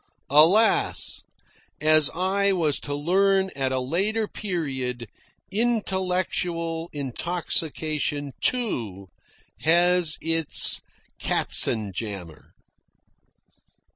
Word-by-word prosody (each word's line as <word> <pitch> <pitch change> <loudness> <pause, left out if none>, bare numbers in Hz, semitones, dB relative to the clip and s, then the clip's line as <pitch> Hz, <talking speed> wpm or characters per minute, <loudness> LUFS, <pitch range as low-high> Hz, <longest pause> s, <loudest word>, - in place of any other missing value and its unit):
(Alas! 175 +10 +3 0.6
as 155 -1 +5
I 195 +2 +1
was 160 -6 0
to 145 - -5
learn 190 +5 +1
at 135 -1 -1
a 130 - -1
later 200 - -1
period, 130 - -4 0.4
intellectual 185 -6 -1
intoxication 150 0 -2
too, 110 - -1 0.5
has 175 0 +3
its 165 -1 +2 0.4
katzenjammer.) 100 - 0
165 Hz, 70 wpm, -24 LUFS, 135-190 Hz, 0.6 s, as